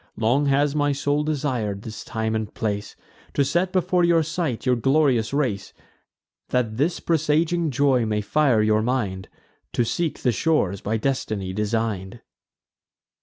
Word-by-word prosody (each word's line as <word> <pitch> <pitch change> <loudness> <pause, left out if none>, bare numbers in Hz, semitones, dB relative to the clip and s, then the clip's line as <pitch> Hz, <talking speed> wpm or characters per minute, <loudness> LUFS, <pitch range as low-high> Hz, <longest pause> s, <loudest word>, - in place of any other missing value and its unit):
Long 125 +6 +2
has 140 +1 +2
my 145 -1 +2
soul 145 +1 0
desir'd 125 -9 -2
this 110 -2 -7
time 110 0 -2
and 110 -1 -2
place, 105 -2 -3 0.4
To 140 - +3
set 175 +6 0
before 180 -1 +2
your 170 -1 +4
sight 160 -7 -3
your 125 -1 +3
glorious 135 -2 +2
race, 130 -9 -1 0.8
That 115 -3 0
this 155 +6 0
presaging 165 +1 +1
joy 135 -4 +2
may 105 -1 0
fire 125 -1 +2
your 110 0 +3
mind 105 -6 -2 0.4
To 120 - +1
seek 165 +6 -2
the 125 - +3
shores 105 - 0
by 110 +2 -1
destiny 110 -6 -2
design'd." 105 0 -2
125 Hz, 145 wpm, -23 LUFS, 110-150 Hz, 0.8 s, your